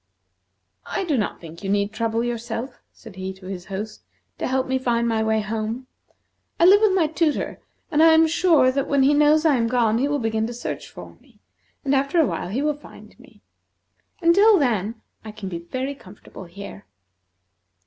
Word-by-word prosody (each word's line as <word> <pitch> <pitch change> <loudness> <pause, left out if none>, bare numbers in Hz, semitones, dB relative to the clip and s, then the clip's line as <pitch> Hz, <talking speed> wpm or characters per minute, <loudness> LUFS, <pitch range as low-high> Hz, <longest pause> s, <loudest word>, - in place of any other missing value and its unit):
"I - - -2
do 325 -6 0
not 215 -5 -2
think 165 +3 -12
you 195 - -3
need 200 +1 0
trouble 230 0 -1
yourself," 235 +1 -5
said 220 -5 -14
he 190 0 -4
to 190 0 -16
his 185 -2 -7
host, 210 +3 -6 0.4
"to - - -1
help 260 0 0
me 260 0 -1
to - - -15
find 235 -1 +1
my 225 -1 0
way 220 0 +1
home. 220 +4 -4 0.7
I 335 - +5
live 400 +3 +7
with 430 -3 +4
my 350 -4 +3
tutor, 315 -1 -1 0.3
and 305 -1 +3
I 325 - +8
am 320 0 +6
sure 320 -5 +3
that 275 +1 -1
when 280 -1 +2
he 280 +2 +4
knows 300 +2 +4
I 295 -4 +4
am 230 -1 +1
gone 230 -2 +2
he 275 - +1
will 290 0 0
begin 220 -3 -1
to 240 - -7
search 245 - -6
for - - -12
me, - - -26 0.5
and 275 - +1
after 275 +5 +1
awhile 315 - 0
he 250 +9 -2
will 300 0 +1
find 295 - -15
me. - - -20 0.8
Until 400 +5 +6
then, 225 - 0 0.2
I 215 - -8
can 205 -2 -7
be 170 -2 -5
very 255 +11 -4
comfortable 190 -5 -13
here." 200 +3 -11
240 Hz, 200 wpm, -23 LUFS, 215-290 Hz, 0.8 s, I